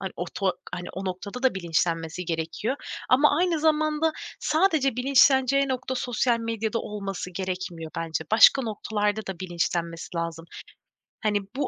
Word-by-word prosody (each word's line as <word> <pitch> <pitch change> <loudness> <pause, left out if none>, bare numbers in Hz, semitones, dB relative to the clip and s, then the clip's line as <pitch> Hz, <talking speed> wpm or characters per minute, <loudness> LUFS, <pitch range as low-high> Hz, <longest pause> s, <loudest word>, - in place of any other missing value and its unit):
hani, 190 -1 -4
o 175 - -2
to 190 -3 +1 0.2
hani, 175 0 -5
o 190 - -5
noktada 200 +6 -5
da 260 - +3
bilinçlenmesi 170 -1 -1
gerekiyor 165 - -2 0.3
ama 285 +3 +5
aynı 350 -2 +2
zamanda 310 0 +2 0.3
sadece 310 - +2
bilinçleneceği 270 +1 +4
nokta 260 0 -2
sosyal 245 -1 +1
medyada 225 0 -2
olması 195 -4 -5
gerekmiyor 180 -3 -4
bence. 160 -1 -2
Başka 230 +5 +7
noktalarda 210 -1 -1
da 190 -3 -5
bilinçlenmesi 170 -1 -3
lazım. 165 -1 -3 0.8
Hani, 210 -1 +1 0.2
bu 285 - 0
210 Hz, 140 wpm, -26 LUFS, 175-260 Hz, 0.8 s, Başka